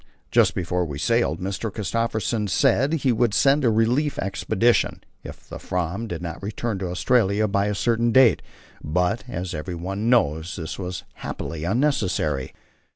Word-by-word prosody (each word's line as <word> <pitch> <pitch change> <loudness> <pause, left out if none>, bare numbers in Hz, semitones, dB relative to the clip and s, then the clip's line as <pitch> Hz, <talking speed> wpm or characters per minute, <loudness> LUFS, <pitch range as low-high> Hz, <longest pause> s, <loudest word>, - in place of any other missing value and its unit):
Just - - +4
before 90 0 -1
we 75 -5 -5
sailed 115 -2 +1
Mr. 100 +3 -3
Christophersen 110 +1 -1
said 135 +8 +3
he 140 -5 +1
would 115 -3 +1
send 140 +4 +4
a 120 - +4
relief 120 +7 +1
expedition, 110 +4 +1 0.2
if - - -11
the - - -8
Fram 90 +5 -3
did 85 -4 -5
not 85 -1 -6
return 105 +1 -3
to 95 - -3
Australia 105 +2 +2
by 100 0 +1
a 105 - -1
certain 115 +2 +1
date; 130 -2 +5 0.4
but, 90 +8 0
as 90 -6 -4
everyone 90 +6 -3
knows, 85 -8 +2
this 80 0 -6
was 90 -1 -5
happily 80 -1 -5
unnecessary. 95 - 0
100 Hz, 155 wpm, -23 LUFS, 90-115 Hz, 0.4 s, date